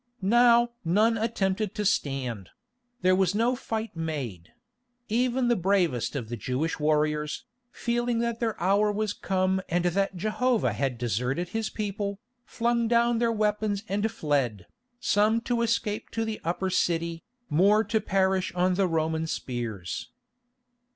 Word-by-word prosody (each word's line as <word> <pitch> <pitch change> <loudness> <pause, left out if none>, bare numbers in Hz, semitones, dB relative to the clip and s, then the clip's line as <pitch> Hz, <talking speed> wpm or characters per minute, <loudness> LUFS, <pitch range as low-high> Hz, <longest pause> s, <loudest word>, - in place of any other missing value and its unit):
Now 240 +3 +5
none 210 +7 +3
attempted 215 -3 -1
to 210 - -2
stand; 130 - -1 0.5
there 185 0 +5
was 190 0 +2
no 235 +4 +2
fight 225 -5 -4
made; 140 - -4 0.6
even 245 +2 +1
the 240 - +3
bravest 175 - +1
of 125 -6 -3
the 120 - -4
Jewish 135 +8 -2
warriors, 150 0 0 0.3
feeling 240 0 -1
that 235 0 -1
their 225 -3 -1
hour 200 +4 +3
was 210 0 -1
come 190 -1 0
and 175 +1 +1
that 195 +2 +1
Jehovah 220 +5 +1
had 135 -3 -1
deserted 125 - -1
His 225 +1 -2
people, 200 -1 -3 0.3
flung 235 0 0
down 235 0 +3
their 235 -1 +2
weapons 210 -1 0
and 205 +3 0
fled, 140 - -1 0.3
some 215 0 +3
to 240 0 -1
escape 225 -2 -1
to 225 0 -1
the 220 -1 -4
Upper 185 +3 -1
City, 170 -2 0 0.3
more 200 +8 +4
to 220 -1 0
perish 190 -1 +1
on 180 +1 +2
the 190 +1 +2
Roman 160 -1 0
spears. 115 - -4
195 Hz, 145 wpm, -27 LUFS, 160-225 Hz, 0.6 s, Now